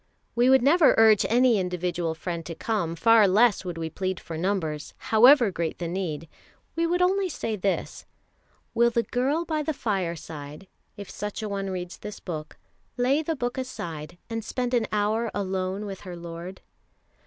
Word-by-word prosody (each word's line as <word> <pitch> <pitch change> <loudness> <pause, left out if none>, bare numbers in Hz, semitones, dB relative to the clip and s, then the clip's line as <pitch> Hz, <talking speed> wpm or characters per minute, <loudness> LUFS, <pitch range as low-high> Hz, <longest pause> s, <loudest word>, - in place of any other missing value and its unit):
We 240 +2 +3
would 265 -2 +5
never 315 +3 +5
urge 220 -2 +6
any 240 -1 +4
individual 175 -2 -2
friend 170 +1 -4
to 165 - -6
come, 170 -5 -2
far 225 +2 +5
less 210 +3 +4
would 175 -2 -5
we 160 -1 -4
plead 185 +1 -3
for 165 - -8
numbers, 160 -4 -2
however 240 0 +6
great 170 -2 -3
the 170 - -4
need; 165 -3 -3 0.5
we 335 0 +1
would 355 +1 +2
only 380 +1 +2
say 225 -8 -3
this: 195 -1 -3 0.7
Will 235 +1 +4
the 235 0 0
girl 275 +9 0
by 315 -2 -1
the 310 0 -2
fireside, 165 - -4 0.3
if 200 -1 -7
such 210 +1 -5
a 215 - -3
one 195 -1 -3
reads 180 -1 -5
this 210 -1 -8
book, 155 -4 -7 0.4
lay 260 +5 +2
the 320 +1 -2
book 245 -1 -3
aside, 170 - -6
and 225 -1 -4
spend 250 +2 -3
an 235 -2 +2
hour 215 +2 0
alone 190 0 -2
with 195 -2 -6
her 180 -3 -8
Lord? 170 +2 -8
200 Hz, 175 wpm, -26 LUFS, 175-245 Hz, 0.7 s, urge